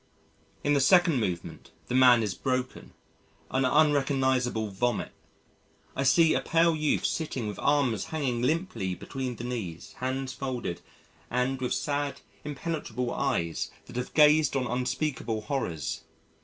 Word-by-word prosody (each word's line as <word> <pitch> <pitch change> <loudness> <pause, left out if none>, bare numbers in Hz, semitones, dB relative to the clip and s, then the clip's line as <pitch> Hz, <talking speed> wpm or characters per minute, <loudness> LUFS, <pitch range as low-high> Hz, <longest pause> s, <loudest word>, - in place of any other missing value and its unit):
In 145 - +2
the 140 - +3
Second 170 0 +5
Movement 85 -5 -4 0.2
the - - -4
man 125 -2 +6
is 105 -4 -1
broken, 130 +4 -3 0.6
an 130 0 +2
unrecognisable 130 -5 +2
vomit. 120 +5 -1 0.8
I - - -1
see 160 +4 +5
a - - +1
pale 165 0 +3
youth 155 -1 0
sitting 135 -8 -2
with 105 - -5
arms 140 -6 +2
hanging 140 -7 -2
limply 135 - -1
between 130 +5 -5
the 115 - -8
knees, 110 -10 -5
hands 130 +1 -2
folded, 125 -11 -4 0.5
and 125 +2 0
with 125 - 0
sad, 145 -1 -2 0.2
impenetrable 140 -5 -3
eyes 85 -1 -1 0.2
that 125 - -12
have 125 - -4
gazed 150 -2 +5
on 130 -2 +1
unspeakable 125 -2 -2
horrors. 85 - -3
130 Hz, 135 wpm, -28 LUFS, 120-145 Hz, 0.8 s, man